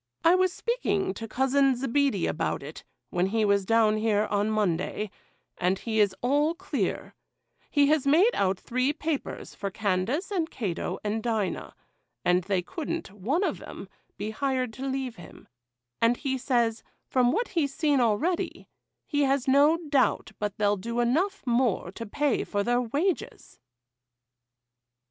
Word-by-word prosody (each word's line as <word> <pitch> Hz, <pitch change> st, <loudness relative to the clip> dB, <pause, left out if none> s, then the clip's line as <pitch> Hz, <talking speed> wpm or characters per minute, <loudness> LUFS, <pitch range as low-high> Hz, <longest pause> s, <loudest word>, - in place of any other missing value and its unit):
I 335 Hz, -, +6 dB
was 370 Hz, 0 st, +3 dB
speaking 360 Hz, -, -1 dB
to 225 Hz, +2 st, -7 dB
Cousin 265 Hz, +3 st, +2 dB
Zebedee 270 Hz, -5 st, +1 dB
about 145 Hz, -, -1 dB
it, 150 Hz, +3 st, -9 dB, 0.3 s
when 180 Hz, +1 st, +1 dB
he 220 Hz, +2 st, +1 dB
was 200 Hz, -2 st, +2 dB
down 225 Hz, -2 st, +4 dB
here, 215 Hz, -1 st, +2 dB
on 205 Hz, +1 st, +1 dB
Monday, 210 Hz, 0 st, -1 dB, 0.5 s
and 185 Hz, +2 st, +2 dB
he 220 Hz, +2 st, -2 dB
is 200 Hz, -3 st, +3 dB
all 290 Hz, +6 st, +2 dB
clear;—he 335 Hz, -5 st, -3 dB
has 290 Hz, -1 st, +2 dB
made 360 Hz, +12 st, +5 dB
out 190 Hz, -1 st, +1 dB
three 255 Hz, +4 st, 0 dB
papers 305 Hz, -2 st, -4 dB
for 200 Hz, -, -4 dB
Candace 210 Hz, -, -1 dB
and 340 Hz, -5 st, 0 dB
Cato 195 Hz, -8 st, -3 dB
and 215 Hz, +1 st, -1 dB
Dinah, 220 Hz, -5 st, -2 dB, 0.5 s
and 180 Hz, 0 st, +3 dB
they 190 Hz, -2 st, 0 dB
couldn't, 325 Hz, -, -5 dB
one 235 Hz, -, -1 dB
of -, -, -1 dB
'em, -, -, -9 dB, 0.3 s
be 215 Hz, -, -3 dB
hired 255 Hz, -1 st, -1 dB
to 265 Hz, +4 st, -5 dB
leave 265 Hz, -3 st, -3 dB
him; 175 Hz, -, -13 dB, 0.5 s
and 230 Hz, +1 st, +4 dB
he 270 Hz, -3 st, -2 dB
says, 240 Hz, -3 st, +1 dB, 0.2 s
from 250 Hz, -1 st, +2 dB
what 465 Hz, -, 0 dB
he's 300 Hz, -6 st, 0 dB
seen 290 Hz, -1 st, +2 dB
already, 240 Hz, -, 0 dB, 0.4 s
he 290 Hz, -, 0 dB
has 275 Hz, 0 st, +1 dB
no 285 Hz, +4 st, +5 dB
doubt 270 Hz, -5 st, +2 dB
but 205 Hz, -1 st, -3 dB
they'll 205 Hz, -1 st, +2 dB
do 235 Hz, +5 st, -3 dB
enough 340 Hz, +12 st, +1 dB
more 235 Hz, -7 st, +1 dB
to 230 Hz, +3 st, -7 dB
pay 285 Hz, +4 st, 0 dB
for 205 Hz, -1 st, -1 dB
their 245 Hz, +3 st, +2 dB
wages. 295 Hz, -, -2 dB
245 Hz, 155 wpm, -27 LUFS, 205-285 Hz, 0.5 s, I